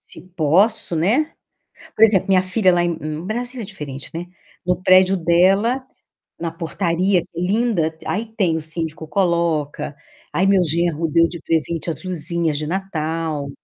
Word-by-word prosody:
se 185 - -10
posso, 175 +3 +2
né. 240 - +1 0.6
Por 220 - +7
exemplo, 200 -3 +3
minha 185 -1 +4
filha 185 0 +2
lá 175 0 +2
em 160 -2 -3
Brasil 245 +5 -4
é 220 - -4
diferente, 140 -6 -8
né. 170 +2 -4 0.4
No 180 0 +1
prédio 185 +1 +5
dela, 195 +9 +2 0.6
na 165 -1 -3
portaria, 175 +2 0
linda. 180 -3 0
Aí 215 +4 -2
tem 180 -6 +1
o 160 - -2
síndico 160 0 -4
coloca. 170 -5 0 0.4
Aí, 190 +2 +2
meu 195 -2 +4
genro 165 0 0
deu 165 +2 +3
de 170 - -8
presente 165 +1 -1
as 165 - -5
luzinhas 170 -3 0
de 150 0 -3
Natal. 160 -5 -3
170 Hz, 150 wpm, -20 LUFS, 160-190 Hz, 0.6 s, Por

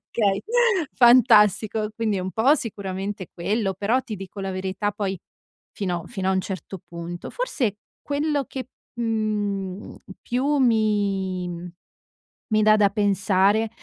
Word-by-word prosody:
Okay 200 -3 +1 0.5
Fantastico!" 220 -3 +5
Quindi, 215 -4 0
un 185 +1 -3
po' 255 +7 +4
sicuramente 195 -3 -4
è - - -22
quello 195 +2 -1
però, 210 +7 +1
ti 215 - -6
dico 195 +1 -8
la 195 - -3
verità 190 +2 -2
poi, 195 -3 -3 0.5
fino 180 -4 -3
fino 190 -4 -3
a - - +3
un 190 - +1
certo 190 -1 -6
punto. 170 0 -7
Forse 265 - -1 0.3
quello 290 0 -1
che, 260 -1 -7 0.3
mhmm, 210 -4 -2 0.3
più 275 +5 0
mi 195 -7 0 0.8
mi 215 0 +4
dà 215 0 +6
da 205 -1 +4
pensare, 200 +1 +2
205 Hz, 130 wpm, -24 LUFS, 190-225 Hz, 0.8 s, dà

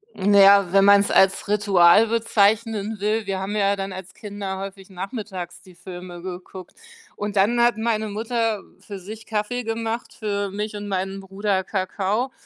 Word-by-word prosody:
Na 200 +1 +3
ja, 195 -2 +6
wenn 195 0 +5
man's 200 0 +5
als 190 +1 +3
Ritual 205 -1 +5
bezeichnen 220 -1 +1
will, 210 +2 -1
wir 195 -1 -2
haben 195 +2 -4
ja 200 -1 +2
dann 195 -1 -5
als 185 -1 -9
Kinder 200 -2 -6
häufig 195 0 -8
nachmittags 190 -2 -7
die 185 -1 -18
Filme 175 0 -9
geguckt. 185 0 -9 0.4
Und 205 0 -4
dann 215 +5 +3
hat 240 -2 +3
meine 220 -1 -1
Mutter 225 0 -1 0.2
für 200 -2 -9
sich 215 +4 -10
Kaffee 225 +3 -2
gemacht, 225 +1 -4
für 205 -2 -3
mich 210 +2 -5
und 205 0 -6
meinen 195 0 -3
Bruder 195 0 -2
Kakao 200 +6 -2
200 Hz, 165 wpm, -23 LUFS, 190-215 Hz, 0.4 s, ja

